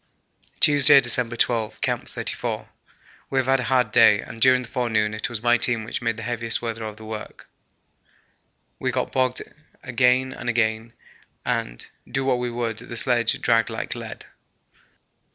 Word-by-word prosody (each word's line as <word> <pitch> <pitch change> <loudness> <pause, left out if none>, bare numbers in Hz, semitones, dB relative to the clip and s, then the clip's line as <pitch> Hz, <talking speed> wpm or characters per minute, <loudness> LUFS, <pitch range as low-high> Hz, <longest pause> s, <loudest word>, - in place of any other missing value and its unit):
Tuesday, 145 -2 +7
December 120 -2 +1
12. 115 -2 -1
Camp - - -2
34. - - -4 0.6
We 135 - -2
have 130 - +2
had 135 +1 +2
a - - -2
hard 125 -4 +1
day, 105 - +6
and 115 - -9
during 130 0 +4
the - - -10
forenoon 115 -4 -1
it 110 - -3
was 120 -2 -4
my 120 0 +3
team 120 -2 +2
which 110 - -5
made 115 -2 -2
the 115 - -7
heaviest 115 -1 -1
weather 115 -1 -5
of 110 -1 -7
the 110 - -12
work. 110 0 -9 1.3
We - - -1
got - - -2
bogged 130 -1 0 0.4
again 125 +1 +1
and 120 - -5
again, 115 0 -1 0.5
and, - - -3 0.2
do 135 +2 -2
what 130 -2 +1
we 125 0 -2
would, 115 -2 -4
the 120 - -8
sledge 120 -2 +1
dragged 115 -2 +2
like - - -4
lead. - - -9
120 Hz, 170 wpm, -23 LUFS, 110-125 Hz, 1.3 s, Tuesday